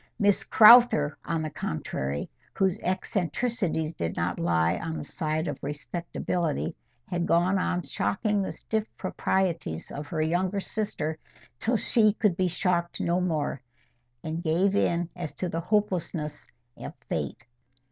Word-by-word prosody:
Miss 205 -3 +3
Crowther, 220 -10 +7
on 165 -1 -1
the 155 - -4
contrary, 70 - -3 0.3
whose 190 +1 +1
eccentricities 185 -2 -1
did 85 - -3
not 85 +1 -1
lie 85 +1 +2
on 160 0 -4
the - - -5
side 155 0 -2
of 145 -2 -4
respectability, 165 +2 -3 0.3
had 175 -2 -1
gone 180 +3 +3
on 180 -1 0
shocking 200 - 0
the 190 - -2
stiff 220 0 -3
proprieties 180 - -1
of 145 +1 -6
her 155 -3 -1
younger 180 +5 0
sister 195 -7 -3 0.4
till 235 +1 +1
she 215 0 +3
could 210 -4 +1
be 185 +1 +1
shocked 175 -1 0
no 175 +2 +1
more, 155 -6 -1 0.6
and 160 +1 -3
gave 180 +4 +2
in 175 -3 +2
as 175 -4 -5
to 185 - -2
the 165 -1 -2
hopelessness 180 -6 -1 0.3
of - - -7
fate. - - -3
170 Hz, 140 wpm, -27 LUFS, 155-190 Hz, 0.6 s, Crowther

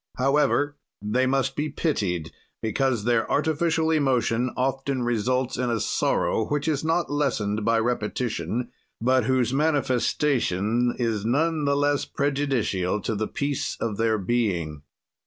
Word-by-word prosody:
"However 145 +2 +2 0.2
they 115 +6 0
must 135 0 0
be 150 +1 -1
pitied 95 - -1 0.3
because 120 0 0
their 115 0 +1
artificial 160 +1 +1
emotion 125 -5 +1
often 135 0 -1
results 120 +2 0
in 125 -1 0
a 115 -1 0
sorrow 110 +1 0
which 145 +1 -1
is 150 -2 0
not 165 +1 0
lessened 110 -8 0
by 115 +1 +2
repetition, 115 -1 -2 0.3
but 130 0 +2
whose 130 -1 +1
manifestation 125 - +1
is 115 -4 -1
none 150 +6 +1
the 140 0 +2
less 145 0 +1
prejudicial 135 -10 0
to 110 - -2
the 110 +1 -2
peace 140 -1 -2
of 110 -3 -2
their 110 -1 +2
being. 90 -8 -1
125 Hz, 135 wpm, -25 LUFS, 110-145 Hz, 0.3 s, However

